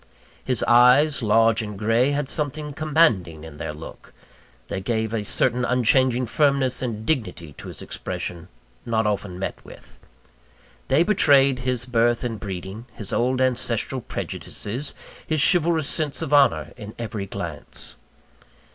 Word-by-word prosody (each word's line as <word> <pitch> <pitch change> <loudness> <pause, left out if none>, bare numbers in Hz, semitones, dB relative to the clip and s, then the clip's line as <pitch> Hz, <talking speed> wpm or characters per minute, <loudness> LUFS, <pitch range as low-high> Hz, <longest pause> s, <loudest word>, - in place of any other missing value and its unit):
His 125 -3 -1
eyes, 125 +5 +5
large 115 +1 +3
and 105 -2 -6
gray, 115 +5 +2
had 145 -1 -1
something 150 0 -2
commanding 135 - +1
in 80 -2 -10
their 75 - -4
look; 75 +2 -11 0.5
they 95 - -4
gave 110 +2 -1
a 110 -2 -1
certain 125 +4 +1
unchanging 125 +1 +2
firmness 140 0 +2
and 110 -4 -4
dignity 90 - -2
to - - -9
his - - -7
expression, 85 0 -5 0.4
not 110 -1 0
often 100 -3 -2
met 95 - -5
with. - - -15 0.9
They 140 +5 +4
betrayed 140 -9 +4
his 125 -1 -1
birth 120 -1 +1
and 115 -3 -3
breeding, 95 +3 -7
his 105 -3 -5
old 130 +2 +1
ancestral 130 -2 0
prejudices, 125 +8 -5 0.3
his 155 -1 0
chivalrous 165 -4 +1
sense 150 -4 -1
of 145 - -3
honour, 80 - +3
in 105 -2 -9
every 110 -4 -5
glance. - - -6
120 Hz, 140 wpm, -23 LUFS, 105-140 Hz, 0.9 s, eyes